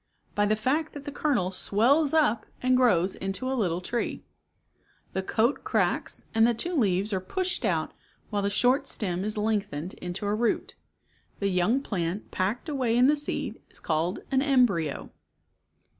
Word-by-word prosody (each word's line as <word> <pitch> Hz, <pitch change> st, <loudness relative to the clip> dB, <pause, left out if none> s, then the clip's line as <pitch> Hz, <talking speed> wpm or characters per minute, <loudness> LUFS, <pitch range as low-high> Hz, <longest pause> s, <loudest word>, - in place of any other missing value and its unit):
By 205 Hz, 0 st, +2 dB
the 215 Hz, -, +3 dB
fact 285 Hz, +8 st, -1 dB
that 285 Hz, -1 st, -9 dB
the 290 Hz, -, -4 dB
kernel 245 Hz, -12 st, 0 dB
swells 255 Hz, +11 st, +2 dB
up 295 Hz, -9 st, +2 dB
and 255 Hz, 0 st, +2 dB
grows 195 Hz, -8 st, +3 dB
into 195 Hz, +7 st, -3 dB
a 265 Hz, -, 0 dB
little 180 Hz, -8 st, 0 dB
tree. 235 Hz, +6 st, -3 dB, 0.9 s
The 190 Hz, -, 0 dB
coat 225 Hz, +7 st, +1 dB
cracks -, -, 0 dB
and 225 Hz, +1 st, +5 dB
the 240 Hz, -, +1 dB
two 350 Hz, +10 st, -2 dB
leaves 200 Hz, -, +1 dB
are 190 Hz, -, +1 dB
pushed 360 Hz, -, -1 dB
out -, -, 0 dB, 0.4 s
while 205 Hz, -1 st, 0 dB
the 200 Hz, -, 0 dB
short 250 Hz, +7 st, +2 dB
stem 185 Hz, -3 st, -2 dB
is 215 Hz, +1 st, -2 dB
lengthened 205 Hz, -6 st, -1 dB
into 180 Hz, +3 st, -4 dB
a 205 Hz, -, +1 dB
root. 225 Hz, +2 st, 0 dB, 0.6 s
The 200 Hz, -, 0 dB
young 195 Hz, +8 st, +2 dB
plant 180 Hz, -2 st, -3 dB
packed 205 Hz, -, -1 dB
away 255 Hz, -6 st, 0 dB
in 250 Hz, -, +6 dB
the 295 Hz, +3 st, +5 dB
seed 295 Hz, 0 st, -3 dB
is -, -, -8 dB
called 165 Hz, +4 st, -1 dB
an 265 Hz, -1 st, +3 dB
emdryo. 245 Hz, -, +1 dB
215 Hz, 170 wpm, -27 LUFS, 190-260 Hz, 0.9 s, in